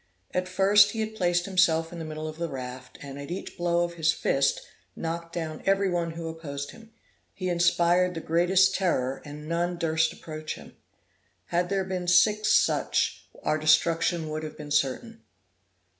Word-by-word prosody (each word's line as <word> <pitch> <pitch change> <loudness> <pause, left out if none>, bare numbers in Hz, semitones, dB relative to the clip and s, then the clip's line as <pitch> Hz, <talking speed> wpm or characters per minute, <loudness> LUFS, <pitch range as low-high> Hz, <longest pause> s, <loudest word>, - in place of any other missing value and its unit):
At 180 0 -1
first 200 +2 +5
he 225 - -4
had 220 0 -2
placed 175 -3 +1
himself 170 -4 +2
in 170 - -7
the 165 - -5
middle 155 0 -5
of 155 0 -7
the 170 -1 -2
raft, 125 -1 -8
and, 140 0 -8
at 140 - -8
each 180 +2 -6
blow 175 -1 +1
of 170 0 -3
his 165 -1 +2
fist, 140 -3 +1 0.3
knocked 170 0 -4
down 160 -2 -5
every 195 -1 +2
one 170 -2 -1
who 165 0 -6
opposed 145 -3 -6
him; 225 0 -15 0.4
he 185 -1 -3
inspired 175 +1 +3
the - - -3
greatest 175 +4 +3
terror, 135 -8 0
and 150 +1 -9
none 175 +1 -1
durst 160 -1 +1
approach 155 -1 -7
him. - - -14 0.7
Had 175 +1 0
there 195 -1 0
been 185 -1 -4
six 210 +4 +4
such, - - +2 0.2
our 155 - +1
destruction 160 +2 +2
would 155 0 -3
have 155 -1 -7
been 150 -1 -9
certain. 150 - -1
170 Hz, 175 wpm, -27 LUFS, 155-180 Hz, 0.7 s, first